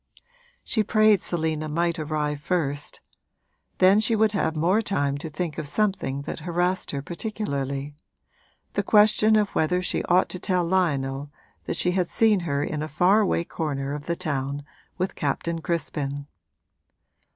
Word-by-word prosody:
She 220 Hz, -, +1 dB
prayed 215 Hz, -2 st, +4 dB
Selina 160 Hz, -2 st, -1 dB
might 170 Hz, +2 st, 0 dB
arrive 150 Hz, -1 st, -2 dB
first: 145 Hz, -4 st, -2 dB, 0.8 s
then 190 Hz, +3 st, +6 dB
she 220 Hz, +1 st, +2 dB
would 215 Hz, 0 st, +3 dB
have 190 Hz, -6 st, 0 dB
more 180 Hz, +8 st, +2 dB
time 145 Hz, -10 st, 0 dB
to 160 Hz, -, -6 dB
think 155 Hz, +1 st, -4 dB
of 145 Hz, -, -4 dB
something 170 Hz, -7 st, -1 dB
that -, -, -5 dB
harassed 175 Hz, +3 st, -1 dB
her 140 Hz, -1 st, -3 dB
particularly 145 Hz, -, -3 dB, 0.8 s
the -, -, +1 dB
question 215 Hz, 0 st, +5 dB
of 210 Hz, -2 st, +3 dB
whether 180 Hz, +3 st, +1 dB
she -, -, 0 dB
ought 180 Hz, +1 st, +3 dB
to 180 Hz, -, -5 dB
tell 180 Hz, -1 st, +1 dB
Lionel 145 Hz, -6 st, 0 dB, 0.4 s
that -, -, -2 dB
she 180 Hz, -, +2 dB
had 180 Hz, -1 st, 0 dB
seen 220 Hz, 0 st, +3 dB
her 140 Hz, 0 st, 0 dB
in 150 Hz, 0 st, -3 dB
a 155 Hz, -, -3 dB
far 180 Hz, +7 st, +3 dB
away 190 Hz, -5 st, +1 dB
corner 140 Hz, -5 st, -3 dB
of 145 Hz, 0 st, -6 dB
the 170 Hz, -, -1 dB
town 140 Hz, -2 st, -3 dB, 0.3 s
with 185 Hz, +1 st, -1 dB
Captain 165 Hz, +3 st, -2 dB
Crispin. 145 Hz, -4 st, -3 dB
170 Hz, 155 wpm, -25 LUFS, 145-190 Hz, 0.8 s, then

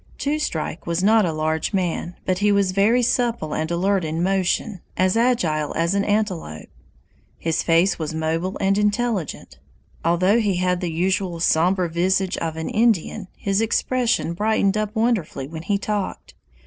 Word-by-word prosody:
Two 295 Hz, +2 st, -1 dB
Strike 165 Hz, -, -3 dB
was 170 Hz, +2 st, -1 dB
not 215 Hz, -1 st, +4 dB
a -, -, -1 dB
large 155 Hz, +3 st, -1 dB
man, 175 Hz, -2 st, -2 dB
but 185 Hz, -1 st, 0 dB
he 205 Hz, 0 st, +3 dB
was 200 Hz, -2 st, +2 dB
very 215 Hz, +6 st, +3 dB
supple 235 Hz, -10 st, 0 dB
and 160 Hz, 0 st, -2 dB
alert 185 Hz, +2 st, +1 dB
in 160 Hz, +2 st, -2 dB
motion, 190 Hz, +1 st, 0 dB, 0.2 s
as 185 Hz, +1 st, +2 dB
agile 180 Hz, -, +1 dB
as 170 Hz, +2 st, +1 dB
an 200 Hz, 0 st, +1 dB
antelope. 190 Hz, -, -2 dB, 0.7 s
His 165 Hz, -1 st, -1 dB
face 170 Hz, +3 st, +2 dB
was 155 Hz, -1 st, -3 dB
mobile 160 Hz, +3 st, -2 dB
and 195 Hz, +1 st, +2 dB
intelligent. 210 Hz, -, -2 dB, 0.4 s
Although 185 Hz, +6 st, +3 dB
he 205 Hz, -4 st, +1 dB
had 180 Hz, 0 st, 0 dB
the 175 Hz, -2 st, -2 dB
usual 180 Hz, +1 st, -1 dB
somber 175 Hz, +2 st, +2 dB
visage 185 Hz, +3 st, 0 dB
of 160 Hz, -1 st, -3 dB
an 160 Hz, -, -3 dB
Indian, 220 Hz, -4 st, +1 dB
his 200 Hz, +1 st, 0 dB
expression 235 Hz, -4 st, 0 dB
brightened 205 Hz, +1 st, +1 dB
up 215 Hz, +1 st, -2 dB
wonderfully 220 Hz, -, 0 dB
when 160 Hz, +1 st, -7 dB
he 200 Hz, +4 st, 0 dB
talked. 205 Hz, -1 st, -4 dB
185 Hz, 160 wpm, -22 LUFS, 165-210 Hz, 0.7 s, not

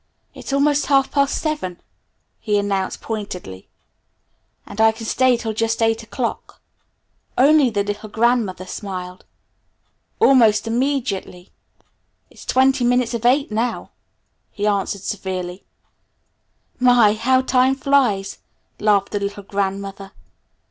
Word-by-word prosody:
"It's -, -, -8 dB
almost 285 Hz, +1 st, +2 dB
half 275 Hz, -2 st, +3 dB
past 280 Hz, -1 st, +1 dB
seven," 295 Hz, -, -3 dB, 0.6 s
he 210 Hz, -1 st, 0 dB
announced 200 Hz, -2 st, -2 dB
pointedly, 185 Hz, -, -6 dB, 1.0 s
"and 220 Hz, -, -4 dB
I 220 Hz, 0 st, +6 dB
can 225 Hz, +1 st, -9 dB
stay 255 Hz, +2 st, +2 dB
till 225 Hz, -2 st, -4 dB
just 225 Hz, +1 st, -1 dB
eight 225 Hz, 0 st, +1 dB
o'clock." 230 Hz, +2 st, -5 dB, 0.8 s
Only 280 Hz, 0 st, +5 dB
the 205 Hz, -3 st, -1 dB
little 205 Hz, +1 st, -5 dB
grandmother 225 Hz, -5 st, 0 dB
smiled. 185 Hz, -2 st, -7 dB, 0.9 s
Almost 230 Hz, -6 st, +4 dB
immediately: 230 Hz, -7 st, -2 dB, 0.8 s
"It's -, -, -14 dB
twenty 265 Hz, 0 st, +2 dB
minutes 245 Hz, 0 st, +1 dB
of 235 Hz, 0 st, 0 dB
eight 275 Hz, 0 st, +2 dB
now!" 230 Hz, +3 st, -2 dB, 0.6 s
he 205 Hz, -, -4 dB
announced 200 Hz, -1 st, -1 dB
severely. 185 Hz, -2 st, -5 dB, 1.1 s
"My, 245 Hz, -4 st, +5 dB
how 255 Hz, +4 st, +2 dB
time 260 Hz, +1 st, +2 dB
flies!" 250 Hz, -9 st, +1 dB, 0.4 s
laughed 205 Hz, -2 st, +2 dB
the 205 Hz, -, -1 dB
little 200 Hz, 0 st, -5 dB
grandmother. 195 Hz, 0 st, -4 dB
220 Hz, 115 wpm, -20 LUFS, 200-255 Hz, 1.1 s, I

